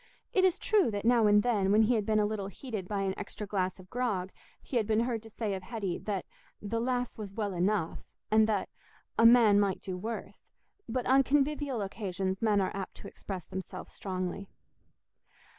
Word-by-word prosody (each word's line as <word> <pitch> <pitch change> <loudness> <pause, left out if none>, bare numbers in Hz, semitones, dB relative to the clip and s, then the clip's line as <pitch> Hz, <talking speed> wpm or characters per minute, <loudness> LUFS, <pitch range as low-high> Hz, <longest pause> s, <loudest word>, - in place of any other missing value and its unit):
It 375 - +4
is 375 0 +4
true 415 - +3
that, 205 -1 -3
now 235 -2 +5
and 205 0 +5
then, 205 -5 +2
when 215 +2 +6
he 230 +3 +3
had 215 -3 0
been 215 -1 +3
a 210 - +3
little 205 -2 -2
heated 210 -2 -6
by 200 -1 -1
an 190 -1 0
extra 210 +1 -6
glass 190 -2 -1
of 185 0 -15
grog, 210 -7 -1 0.3
he 255 - -3
had 220 -3 +1
been 220 0 +3
heard 235 -2 -1
to 225 - -12
say 215 -1 -3
of 190 - -4
Hetty 195 -3 -3
that 200 -3 -3 0.3
the 220 +2 -2
"lass 245 -1 -1
was 200 -2 -7
well 205 -3 -2
enough," 180 -1 0 0.3
and 220 0 +5
that 210 -3 0 0.5
"a 230 - +9
man 230 -4 +7
might 200 -2 +1
do 185 -2 -4
worse"; 220 +5 -6 0.5
but 250 +1 -1
on 265 +1 +5
convivial 280 -3 +1
occasions 190 -1 -3
men 215 -3 +3
are 190 - -1
apt 195 -2 -5
to - - -10
express 185 -4 -7
themselves 190 0 -7
strongly. 185 0 -4
210 Hz, 200 wpm, -30 LUFS, 195-235 Hz, 0.5 s, a